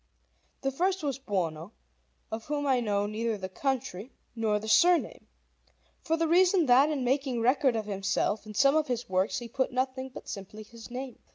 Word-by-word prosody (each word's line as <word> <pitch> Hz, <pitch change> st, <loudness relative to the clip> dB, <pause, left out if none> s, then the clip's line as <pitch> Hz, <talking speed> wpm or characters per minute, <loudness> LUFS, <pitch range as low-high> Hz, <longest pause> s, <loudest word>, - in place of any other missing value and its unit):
The 270 Hz, -, 0 dB
first 370 Hz, +5 st, 0 dB
was 275 Hz, -2 st, -2 dB
Buono, 180 Hz, -, -3 dB, 0.6 s
of 220 Hz, 0 st, -5 dB
whom 290 Hz, -1 st, -2 dB
I 265 Hz, -3 st, +3 dB
know 205 Hz, -3 st, 0 dB
neither 220 Hz, +1 st, -2 dB
the 190 Hz, -1 st, -5 dB
country 250 Hz, 0 st, -3 dB, 0.2 s
nor 220 Hz, -2 st, +1 dB
the 215 Hz, +1 st, -6 dB
surname, 345 Hz, +9 st, +3 dB, 0.7 s
for 325 Hz, -, 0 dB
the 330 Hz, 0 st, +1 dB
reason 360 Hz, +1 st, +4 dB
that 265 Hz, +3 st, +5 dB
in 290 Hz, -4 st, -1 dB
making 260 Hz, -1 st, 0 dB
record 255 Hz, +1 st, +3 dB
of 220 Hz, -1 st, -2 dB
himself 200 Hz, +1 st, -1 dB
in 215 Hz, -, -9 dB
some 275 Hz, +5 st, +4 dB
of 310 Hz, -1 st, +2 dB
his 245 Hz, -1 st, -3 dB
works 185 Hz, +2 st, 0 dB
he 240 Hz, -, -5 dB
put 260 Hz, +3 st, -1 dB
nothing 260 Hz, +1 st, -2 dB
but -, -, -11 dB
simply 205 Hz, +2 st, -7 dB
his 230 Hz, +2 st, -13 dB
name. 255 Hz, 0 st, -7 dB
250 Hz, 185 wpm, -29 LUFS, 215-275 Hz, 0.7 s, that